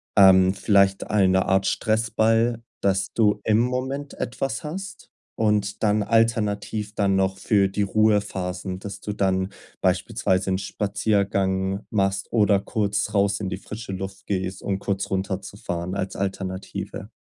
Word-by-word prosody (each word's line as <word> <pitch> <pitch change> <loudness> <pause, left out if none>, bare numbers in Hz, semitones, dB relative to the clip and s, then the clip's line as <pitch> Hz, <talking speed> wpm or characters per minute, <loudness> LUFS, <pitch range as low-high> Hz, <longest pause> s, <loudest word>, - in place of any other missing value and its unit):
Ähm, 95 -2 +7
vielleicht 100 -1 +2
eine 95 -2 +3
Art 95 0 +2
Stressball, 115 +2 +1 0.2
dass 95 -1 +1
du 105 -3 +3
im 110 -1 +3
Moment 130 +4 -2
etwas 125 -1 -3
hast 190 +5 -7 0.3
und 105 -2 0
dann 105 -1 +2
alternativ 105 -1 0
dann 100 -2 +1
noch 95 0 +1
für 100 -1 +2
die 100 +2 -2
Ruhephasen, 100 -3 0
dass 100 +1 -8
du 105 - -4
dann 95 -1 0 0.3
beispielsweise 95 +1 +1
'n 95 - 0
Spaziergang 100 -1 0
machst 95 -2 0
oder 105 -3 +4
kurz 105 0 -1
raus 100 0 +2
in 100 -3 -3
die 95 - -3
frische 105 +1 -7
Luft 95 +1 -7
gehst, 95 -1 -2
um 100 -1 -1
kurz 100 0 -2
runterzufahren 95 -2 -3
als 95 -1 -3
Alternative. 95 -1 -4
100 Hz, 135 wpm, -24 LUFS, 95-110 Hz, 0.3 s, Ähm